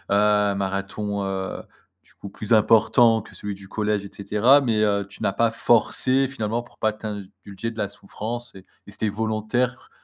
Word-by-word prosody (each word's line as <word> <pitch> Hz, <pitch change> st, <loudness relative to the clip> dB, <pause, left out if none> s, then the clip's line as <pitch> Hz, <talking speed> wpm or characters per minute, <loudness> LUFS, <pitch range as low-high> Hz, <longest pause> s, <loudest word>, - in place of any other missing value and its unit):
un 105 Hz, -1 st, +3 dB
marathon, 100 Hz, +1 st, -3 dB
heu, 95 Hz, -1 st, -3 dB, 0.4 s
du -, -, -22 dB
coup 100 Hz, -, -10 dB
plus 105 Hz, +3 st, -2 dB
important 115 Hz, +1 st, +5 dB
que -, -, -15 dB
celui 105 Hz, -1 st, -5 dB
du 95 Hz, 0 st, -13 dB
collège 105 Hz, -1 st, -1 dB
et -, -, -9 dB
cetera, 105 Hz, +8 st, +4 dB
mais, 115 Hz, -5 st, 0 dB
heu, 100 Hz, -1 st, +1 dB
tu 100 Hz, -, -13 dB
n'as 100 Hz, -, +1 dB
pas 115 Hz, +2 st, +2 dB
forcé, 130 Hz, +3 st, +2 dB
finalement. 115 Hz, -2 st, -2 dB
Pour 120 Hz, -, -20 dB
pas 110 Hz, -1 st, +1 dB
t'ind 105 Hz, -2 st, -6 dB, 0.2 s
dulger 100 Hz, +3 st, -5 dB
de 115 Hz, -, -14 dB
la 100 Hz, -2 st, -1 dB
souffrance 110 Hz, +4 st, -7 dB
et 95 Hz, -, -13 dB, 0.2 s
et -, -, -11 dB
c'était 105 Hz, +1 st, -1 dB
volontaire, 110 Hz, +4 st, -2 dB
105 Hz, 185 wpm, -23 LUFS, 100-115 Hz, 0.4 s, important